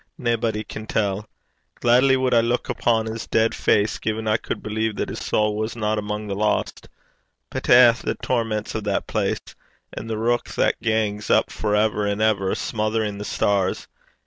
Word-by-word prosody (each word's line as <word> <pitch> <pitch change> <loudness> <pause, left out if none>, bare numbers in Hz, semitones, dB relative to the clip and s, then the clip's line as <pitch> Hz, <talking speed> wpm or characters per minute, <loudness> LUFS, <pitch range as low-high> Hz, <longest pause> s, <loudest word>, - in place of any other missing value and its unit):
Naebody 115 -3 -1
can 110 +1 -8
tell. 105 0 -1 0.5
Glaidly 130 +3 +4
wad 130 -1 +1
I 115 - +6
luik 120 +2 -1
upon 115 -2 +1
's 110 0 -5
deid 110 0 +2
face 105 +1 +1
gin 110 0 -3
I 110 +1 +3
cud - - -5
believe 110 0 -2
that - - -3
his - - -5
sowl 105 0 +1
wasna 110 0 -1
amang 105 0 -3
the 100 - -3
lost. 105 +2 -1 0.6
But - - -4
eh! 120 -1 +8
the 120 - -4
torments 115 -3 -2
o' - - 0
that 105 -2 -2
place! - - -2 0.5
and 115 - -7
the 110 - -1
reik 120 +2 -1
that - - +1
gangs 110 -2 -1
up - - +3
for 105 -1 -1
ever 105 -1 +1
an' 100 0 -1
ever, 105 -3 +2
smorin' - - -5
(smothering) 110 -2 -1
the 105 - -5
stars! 100 -3 0
110 Hz, 180 wpm, -23 LUFS, 105-115 Hz, 0.6 s, eh